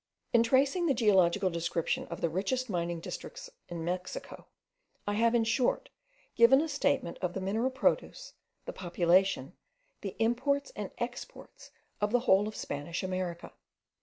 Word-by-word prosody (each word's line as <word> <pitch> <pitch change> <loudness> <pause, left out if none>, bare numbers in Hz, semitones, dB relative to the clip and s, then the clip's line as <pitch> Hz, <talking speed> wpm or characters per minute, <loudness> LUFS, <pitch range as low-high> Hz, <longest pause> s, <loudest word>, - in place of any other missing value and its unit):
In 235 - +6
tracing 275 +9 +3
the 275 - +2
geological 190 -4 +3
description 170 0 -1
of 170 - -7
the 170 - +1
richest 225 +7 -1
mining 170 -1 -1
districts - - -8 0.2
in 170 -2 -5
Mexico, 180 +1 -5 0.6
I 205 - -1
have, 230 +3 +3
in 235 - +4
short, 235 +2 +1 0.5
given 235 +4 +7
a 320 - 0
statement 280 - 0
of 180 -1 -2
the - - -1
mineral 215 +7 0
produce, 265 - -1 0.3
the - - -5
population, 175 -3 +2 0.5
the 195 -3 -5
imports 260 - +1
and - - -4
exports - - -7 0.3
of 210 0 +1
the 245 0 +3
whole 205 -4 +4
of 215 - -6
Spanish 145 +5 -4
America. 185 -2 -4
205 Hz, 150 wpm, -30 LUFS, 175-255 Hz, 0.6 s, given